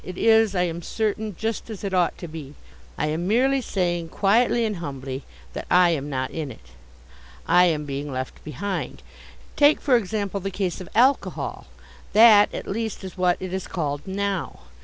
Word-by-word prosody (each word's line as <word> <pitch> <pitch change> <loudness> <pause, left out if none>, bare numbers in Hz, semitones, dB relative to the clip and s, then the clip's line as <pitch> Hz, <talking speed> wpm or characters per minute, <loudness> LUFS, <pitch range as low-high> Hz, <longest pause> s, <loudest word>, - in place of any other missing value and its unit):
It 185 0 -8
is, 225 -2 +4
I 180 - +2
am 170 -1 -3
certain, 215 +1 -2
just 225 0 -3
as 215 -3 -7
it 195 -1 -3
ought 180 -2 +2
to 175 - -7
be. 150 -3 -9 0.4
I - - 0
am 165 +3 -2
merely 265 +6 +3
saying, 175 -6 -1
quietly 230 +5 +2
and 210 -3 -2
humbly, 135 -4 -6 0.3
that - - -6
I 180 -1 +5
am 145 -3 -2
not 130 -2 -2
in 155 -3 -4
it. 65 - -15 0.8
I 180 +2 +6
am 155 -4 0
being 140 +1 -4
left 130 0 -5
behind. 195 +6 -4 0.5
Take, 295 +1 +5
for 270 -3 +3
example, 200 -2 -1
the 195 +1 -3
case 185 -1 -3
of 180 - -9
alcohol. 260 +5 +1 0.5
That, 215 -1 +7
at - - -6
least, 220 0 -3
is 190 -2 -7
what 180 -2 +2
it 185 -1 -5
is 190 - -3
called 145 -1 -3
now. 195 -1 -3
185 Hz, 180 wpm, -24 LUFS, 165-215 Hz, 0.8 s, That